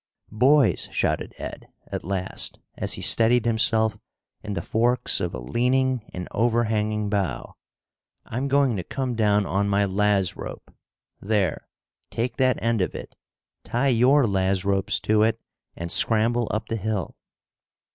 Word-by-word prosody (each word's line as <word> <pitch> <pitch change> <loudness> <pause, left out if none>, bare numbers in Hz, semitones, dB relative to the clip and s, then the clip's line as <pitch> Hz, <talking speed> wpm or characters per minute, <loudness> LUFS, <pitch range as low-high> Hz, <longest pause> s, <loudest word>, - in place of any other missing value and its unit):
"Boys," 135 +7 +3
shouted - - -1
Ed, - - -8 0.2
at - - -6
last, 95 0 -3 0.2
as - - -2
he - - -5
steadied 115 +1 +5
himself 110 -2 +1 0.4
in 105 -1 -5
the - - -3
forks 120 +2 +1
of - - -2
a - - -5
leaning 125 - 0
and 90 -1 -6
overhanging 110 -2 0
bough, 95 -11 -2 0.7
"I'm 130 +5 -3
going 140 -3 +2
to 90 - -3
come 130 +3 -3
down 105 -2 +2
on 100 +2 0
my 100 0 +2
laz 100 -1 +1
rope. - - -9 0.5
There, 100 -5 -1 0.4
take 115 +1 -3
that 130 -2 +2
end 115 -2 +1
of 90 - -2
it, - - -9 0.5
tie 130 +4 0
your 130 +3 +4
laz 95 -2 0
ropes 100 -1 +1
to 110 0 +2
it 110 +1 +2 0.4
and 85 0 -6
scramble 115 +3 +2
up 110 - -3
the 115 - -1
hill." 105 -1 -3
110 Hz, 145 wpm, -24 LUFS, 100-120 Hz, 0.7 s, steadied